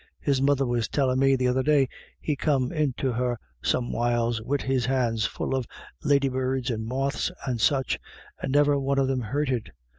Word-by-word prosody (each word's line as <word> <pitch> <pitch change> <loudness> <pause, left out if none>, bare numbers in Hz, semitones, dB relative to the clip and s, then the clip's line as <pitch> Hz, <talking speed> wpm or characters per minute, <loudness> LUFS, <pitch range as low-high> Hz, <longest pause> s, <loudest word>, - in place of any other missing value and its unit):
His 140 -2 +1
mother 140 0 +3
was 120 -2 0
tcllin' 130 -2 +1
me 135 0 +4
the 130 -1 +1
other 125 +1 +2
day 145 -1 +3 0.3
he 150 - -1
come 135 -3 +1
into 140 -5 0
her 120 0 -1 0.2
some 120 -1 0
whiles 120 -1 0
wid 140 +5 -1
his 130 -2 0
hands 120 -5 +1
full - - -3
of 130 -3 -1 0.4
ladybirds 130 -2 +1
and 110 -1 -3
moths 135 +7 -1
and 125 -4 -2
such, 135 +1 +2 0.4
and - - -2
niver 145 0 +4
one 140 0 0
of 135 -1 +3
them 130 -1 0
hurted. 130 0 -2
130 Hz, 180 wpm, -26 LUFS, 120-140 Hz, 0.4 s, me